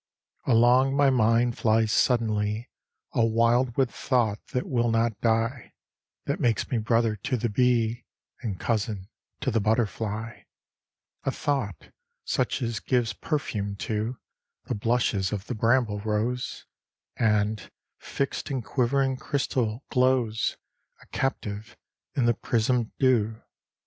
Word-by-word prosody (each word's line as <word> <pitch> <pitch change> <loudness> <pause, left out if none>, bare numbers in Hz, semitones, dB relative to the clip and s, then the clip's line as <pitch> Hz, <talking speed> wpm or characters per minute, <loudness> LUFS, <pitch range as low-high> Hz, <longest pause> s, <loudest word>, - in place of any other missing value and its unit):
XXIII 125 - +3
Along 125 +4 +5
my 140 -1 +5
mind 120 0 +3
flies 110 -1 +3
suddenly 110 -2 +1 0.4
A 115 - +3
wildwood 120 +3 +2
thought 115 -6 0
that 125 - -2
will 120 -2 +1
not 115 -2 +1
die, 115 +2 0 0.5
That - - -1
makes 115 -3 +1
me 120 - +1
brother 115 0 +2
to 125 +6 -2
the 120 +1 -1
bee, 120 0 +1 0.4
And 105 -8 -4
cousin 105 -3 -2 0.3
to 130 - 0
the 115 - +2
butterfly: 110 0 -1 0.8
A - - 0
thought, 130 - -2 0.3
such - - 0
as 115 -3 -2
gives 120 -4 0
perfume 105 -7 -2
to 110 +4 -3 0.5
The - - -2
blushes 105 -3 +1
of 100 -1 -3
the 125 - -4
bramble 115 -2 +2
rose, 110 +4 -2 0.5
And, 105 -2 +1 0.3
fixed 140 +2 -3
in 135 -4 -2
quivering 135 +2 +1
crystal, 130 -5 -1
glows 125 -4 +2 0.5
A - - -22
captive 110 -5 -3 0.4
in 130 - +2
the 120 - +4
prismed 115 +1 0
dew. 115 -4 +2
115 Hz, 125 wpm, -26 LUFS, 110-125 Hz, 0.8 s, Along